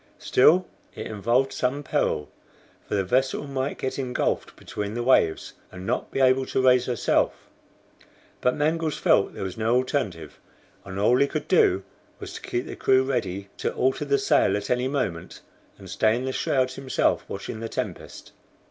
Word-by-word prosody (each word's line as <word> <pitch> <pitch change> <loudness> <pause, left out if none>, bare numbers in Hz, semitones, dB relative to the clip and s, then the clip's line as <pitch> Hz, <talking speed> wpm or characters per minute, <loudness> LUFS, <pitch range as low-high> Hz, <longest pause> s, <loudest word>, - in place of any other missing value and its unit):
Still 175 +8 +4 0.3
it - - -6
involved 120 +6 0
some 135 +3 -1
peril, 75 - 0 0.6
for - - -2
the 100 - +1
vessel 130 +8 0
might 135 0 -3
get 130 +1 -3
engulfed 125 -2 -2
between 105 +1 -5
the 120 - -2
waves, 120 -10 +2 0.2
and 90 0 -9
not 120 +4 -1
be - - -3
able 130 0 +3
to - - -1
raise 125 -1 +4
herself. 120 -4 0 0.9
But 125 - +2
Mangles 155 +1 0
felt - - +2
there - - -5
was 95 +3 -5
no 110 +2 +2
alternative, 105 - -2 0.4
and 95 0 -8
all 115 +5 +4
he 140 - +4
could 150 +1 -4
do 100 - +3 0.4
was - - -8
to - - -8
keep 120 +1 -3
the - - -7
crew 130 0 +3
ready 100 -7 -3
to - - -1
alter 130 +3 +1
the 140 -1 +2
sail 100 - +3
at 100 +2 -5
any 125 +1 +1
moment, 120 - -3 0.4
and 95 - -12
stay 110 +5 +2
in 125 +2 -3
the 130 - -1
shrouds 130 -1 0
himself 130 0 0
watching 100 +3 -6
the 115 0 -5
tempest. - - -6
125 Hz, 175 wpm, -25 LUFS, 105-135 Hz, 0.9 s, Still